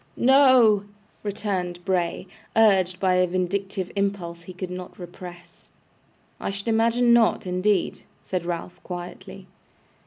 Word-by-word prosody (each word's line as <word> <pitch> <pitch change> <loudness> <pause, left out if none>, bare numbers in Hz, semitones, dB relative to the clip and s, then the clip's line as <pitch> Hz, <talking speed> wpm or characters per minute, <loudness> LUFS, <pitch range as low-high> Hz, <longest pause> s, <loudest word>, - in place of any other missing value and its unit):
'No!' 255 -6 +5 0.4
returned 185 -4 -3
Bray, 180 -3 -1 0.3
urged 190 -5 +4
by 185 -1 +2
a 180 0 +3
vindictive 185 +1 -2
impulse 195 -4 -2
he 170 - -10
could 180 0 -6
not 180 0 -8
repress. 175 0 -11 0.7
'I - - -3
should 200 +2 -5
imagine 230 +2 +3
not, 230 -4 +3
indeed!' 185 +1 0 0.2
said 185 -2 -3
Ralph, 175 +1 -5
quietly. 185 +2 -8
190 Hz, 120 wpm, -24 LUFS, 180-210 Hz, 0.7 s, No